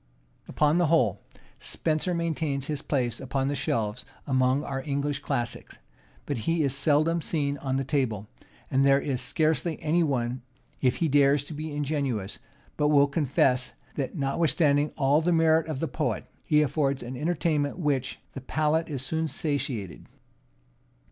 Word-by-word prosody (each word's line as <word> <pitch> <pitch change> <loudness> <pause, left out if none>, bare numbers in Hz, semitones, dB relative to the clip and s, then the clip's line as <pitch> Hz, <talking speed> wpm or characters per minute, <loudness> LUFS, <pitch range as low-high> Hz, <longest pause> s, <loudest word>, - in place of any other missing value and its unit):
Upon 150 +3 +2
the 175 - +3
whole, 130 - +2 0.4
Spenser 160 +3 -1
maintains 160 -5 -1
his 150 -2 -3
place 125 -7 -1
upon 135 +1 -1
the 145 - -1
shelves 115 -2 -1 0.2
among 130 +1 +2
our 135 -1 -3
English 140 0 -1
classics; 120 -4 -4 0.5
but 140 -5 -2
he 165 -1 +2
is 140 -2 0
seldom 155 +4 +2
seen 145 -3 -1
on 130 -1 -2
the 135 - 0
table; 125 -7 -1 0.4
and 135 +1 +3
there 140 0 +5
is 135 -3 -2
scarcely 155 +4 0
any 160 +3 +1
one, 125 -5 0 0.4
if 125 -2 +3
he 165 - 0
dares 140 -1 +4
to 150 - -8
be 155 +1 -5
ingenuous, 140 -9 -2 0.4
but 150 - +2
will 145 -1 +5
confess, 135 -3 +1 0.2
that, 135 +2 -3
notwithstanding 145 +1 +2
all 145 +1 +3
the 175 +2 +1
merit 160 -1 +3
of 155 -4 -3
the - - -1
poet, - - -2 0.2
he 150 0 +4
affords 140 -1 0
an 125 +2 -6
entertainment 155 0 0
with 175 - -5
which 135 -1 -4
the 135 - -6
palate 155 +4 0
is 135 -4 -4
soon 160 +2 -1
satiated. 140 - -3
145 Hz, 160 wpm, -27 LUFS, 130-155 Hz, 0.5 s, there